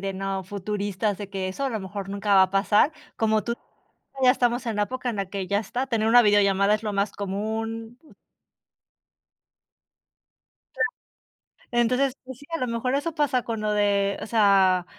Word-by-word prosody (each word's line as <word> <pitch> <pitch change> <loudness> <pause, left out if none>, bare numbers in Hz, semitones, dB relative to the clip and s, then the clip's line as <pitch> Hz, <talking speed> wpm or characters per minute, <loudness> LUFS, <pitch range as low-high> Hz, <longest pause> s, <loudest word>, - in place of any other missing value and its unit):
de 195 0 -3
no 195 0 -3
futuristas, 205 +1 -3
de 205 -2 -6
que 190 -1 -3
eso 275 +9 -4
a - - +1
lo 220 -4 -3
mejor 195 +1 -6
nunca 200 0 0
va 190 - +7
a 185 - -6
pasar. 205 +8 +3 0.2
Como 220 -1 +1
tú, 235 - -2 0.7
ya 250 - +8
estamos 245 -1 0
en 220 -2 -2
época 255 +3 -2
en 225 - -5
la 195 -1 -2
que 195 -2 -4
ya 200 +1 +1
está, 250 +4 -3
tener 225 -3 0
una 245 +1 +7
videollamada 205 -1 +4
es 215 - -3
lo 210 -2 -2
más 200 +1 0
común. 225 +4 -4 2.8
Claro. 445 - +2 0.8
Entonces, 250 +3 +2
pues 260 -1 -9
sí, 285 - -14
a - - +1
lo 255 - -1
mejor 235 +3 -1
eso 315 +4 -2
pasa 285 -5 +1
con 225 -2 -4
lo 210 0 0
de 200 -1 +1
o - - -5
sea, 195 -5 +4
210 Hz, 180 wpm, -25 LUFS, 200-240 Hz, 2.8 s, ya